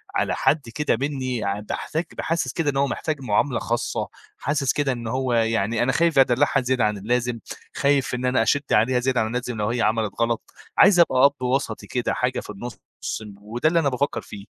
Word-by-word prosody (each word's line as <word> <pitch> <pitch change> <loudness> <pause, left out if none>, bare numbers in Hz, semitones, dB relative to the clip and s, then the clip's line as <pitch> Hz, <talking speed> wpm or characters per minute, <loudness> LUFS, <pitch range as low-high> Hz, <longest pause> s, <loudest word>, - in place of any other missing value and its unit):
على - - +1
حد 145 -6 +1
كده 150 -6 +1
منّي 130 -3 -2
يعني 100 -1 -2
باحتاج 160 +2 -2
تبقى 170 - -8
حاسس 165 +1 -1
كده 160 -3 0
إن 135 - -2
هو 140 0 +3
محتاج 150 0 -3
مُعاملة 125 +2 +1
خاصّة، 120 0 -2 0.3
حاسس 140 -1 0
كده 145 -2 0
إن 120 -2 -4
هو 130 +1 -1
يعني 115 0 +1
أنا 130 - +2
خايف 165 +1 +2
أدلّعها 135 +1 +3
زيادة 125 -3 +1
عن 105 -1 0
اللازم، 120 +3 -1 0.4
خايف 140 -3 +1
إن 125 +1 -3
أنا 125 -2 +3
أشِد 145 +5 +1
عليها 120 +4 +3
زيادة 130 0 +1
عن 110 - 0
اللازم 125 +1 -3
لو 105 0 -1
هي 120 0 -1
عَملت 110 -1 +1
غلط، 115 -1 -1 0.2
عايز 195 -3 +6
ابقى 135 -6 +5
أب 140 -2 +2
وسطي 130 +2 -1
كده - - -1
حاجة - - -1
في - - -10
النُص، 120 +4 -6 0.5
ن 105 -2 -10
وده 120 +8 0
اللي 170 +1 +3
أنا 145 -4 +2
بافكّر 140 +2 -1
فيه. 100 -1 -10
125 Hz, 210 wpm, -23 LUFS, 115-140 Hz, 0.5 s, عايز